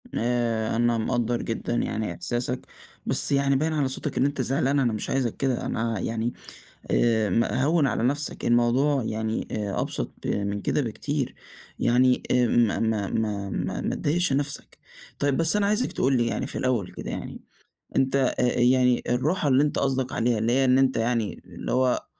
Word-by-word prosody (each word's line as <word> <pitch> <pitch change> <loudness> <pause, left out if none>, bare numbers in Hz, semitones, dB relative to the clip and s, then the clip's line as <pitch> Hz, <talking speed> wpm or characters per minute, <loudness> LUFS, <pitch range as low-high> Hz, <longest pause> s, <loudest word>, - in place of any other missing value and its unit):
آآ، 115 -2 0
أنا 120 0 +2
مقدّر 120 +1 0
جدًا 115 +1 -3
يعني 110 -5 -2
إحساسك، 125 +4 -2 0.4
بس - - +2
يعني 140 0 +3
باين 155 +4 0
على 145 -3 +1
صوتك 130 - -3
إن 130 - +3
أنت 140 -1 -1
زعلان 135 +2 +1
أنا 120 -4 +1
مش 105 - -4
عايزك 130 -4 -1
كده، 130 -3 -1
أنا 115 -1 -2
يعني 115 +1 -2 0.6
آآ، 110 -3 +2
م 115 +6 +2
هوّن 145 +5 +2
على 115 - -1
نفسك 145 +4 -1
الموضوع 125 +4 +2
يعني 110 0 -2
آآ، 105 -2 -2
أبسط - - -3
ب - - -4
من 100 0 -1
كده 150 - 0
بكتير 140 +3 -3 0.4
يعني 125 +1 +3
آمم، 120 -2 +3
ما - - -2
ما 110 -3 0
ما 105 -3 -2
ما - - -3
ما - - -2
تضايقش 170 0 0
نفسك، 145 +1 -3 0.4
طيب 140 -1 +1
بس 165 +3 +2
أنا 210 -1 +2
عايزك 210 +5 +1
تقول 130 0 +1
لي 120 -1 +1
يعني - - -2
في - - -5
الأول 120 -8 0
كده - - -7
يعني - - -6 0.5
أنت 135 0 +2
آآ، 135 -2 +2
آآ، 125 0 +1
يعني 125 0 +3
الراحة 145 +7 +1
اللي 135 +2 +4
أنت 150 - 0
قصدك 130 -1 0
عليها 120 0 +1
اللي 115 +2 +1
هي 135 +1 +3
إن 130 0 +4
أنت 135 -1 +2
يعني 115 -2 -1
اللي - - -6
هو 130 0 +1
125 Hz, 185 wpm, -25 LUFS, 115-135 Hz, 0.6 s, اللي